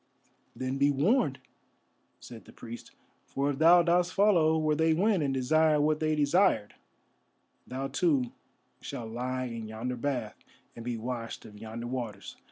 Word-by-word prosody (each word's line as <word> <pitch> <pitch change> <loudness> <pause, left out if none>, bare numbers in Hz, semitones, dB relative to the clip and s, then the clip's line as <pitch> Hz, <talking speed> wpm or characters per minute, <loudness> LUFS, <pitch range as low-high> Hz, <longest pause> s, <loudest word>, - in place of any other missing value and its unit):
"Then 130 +1 -3
be 140 +1 +4
warned," 145 - +2 0.8
said 115 -3 -12
the - - -14
priest, 120 0 -10 0.4
"for 140 +1 -1
if 135 - -6
thou 170 +2 +7
dost 175 +1 +1
follow 175 -6 +4
where 155 -1 +1
they 160 +1 +2
went, 195 +1 +2
and 140 -2 0
desire 150 +4 +3
what 155 +1 +2
they 155 0 +1
desired, 145 - +2 0.9
thou 135 +2 -4
too 135 -3 +1 0.5
shalt 115 -2 -6
lie 130 +2 -3
in 115 -2 -6
yonder 115 +4 -4
bath, 125 -3 -3 0.4
and 115 - -8
be 120 -1 -3
washed 115 0 -5
of 105 -1 -12
yonder 110 +2 -7
waters. 120 -6 -5
135 Hz, 155 wpm, -29 LUFS, 120-160 Hz, 0.9 s, thou